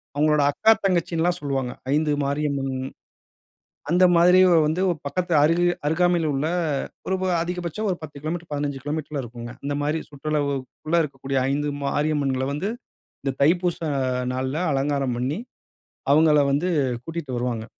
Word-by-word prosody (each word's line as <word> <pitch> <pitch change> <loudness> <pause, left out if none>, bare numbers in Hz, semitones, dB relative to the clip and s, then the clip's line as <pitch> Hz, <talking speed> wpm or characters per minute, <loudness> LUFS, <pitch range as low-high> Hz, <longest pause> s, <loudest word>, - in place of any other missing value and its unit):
அவங்களோட 150 0 +3
அக்கா 220 +8 +4
தங்கச்சின்னுல்லாம் 175 -1 +1
சொல்லுவாங்க, 135 -3 -2 0.2
5 155 0 +2
மாரியம்மன். 140 -1 -1 1.2
அந்த 180 +2 +5
மாதிரி 180 +2 +6 0.3
வந்து 160 +4 0 0.3
பக்கத்து 180 +3 -2
அருகா 175 +3 +3
அருகாமையில 170 +1 +2
உள்ள 140 +3 0 0.6
ஒரு 190 - +1
வ - - +1 0.2
அதிகபட்சம் 180 +4 -3
ஒரு 180 - -1
10 150 -2 -9
கிலோமீட்டர், 165 +2 -4
15 145 -2 -3
கிலோமீட்டர்ல 150 -1 -3
இருக்கும்ங்க. 120 0 -8
இந்த 145 - -1
மாரி 150 +2 0
சுற்றளவுக்குக்குள்ள 145 +2 -2
இருக்கக்கூடிய 135 -1 -3
5 145 +1 0
மரியம்மன்கள 140 -2 0
வந்து 190 +9 -2 0.5
இந்த 135 - 0
தைப்பூசம் 165 -2 +1 0.4
நாள்ல 130 +3 -2 0.2
அலங்காரம் 135 -2 0
பண்ணி, 135 +7 -1 0.7
அவங்கள 150 0 +5
வந்து 155 +6 +1 0.4
கூட்டிட்டு 165 -2 -5
வருவாங்க. 120 -2 -2
150 Hz, 130 wpm, -24 LUFS, 140-170 Hz, 1.2 s, மாதிரி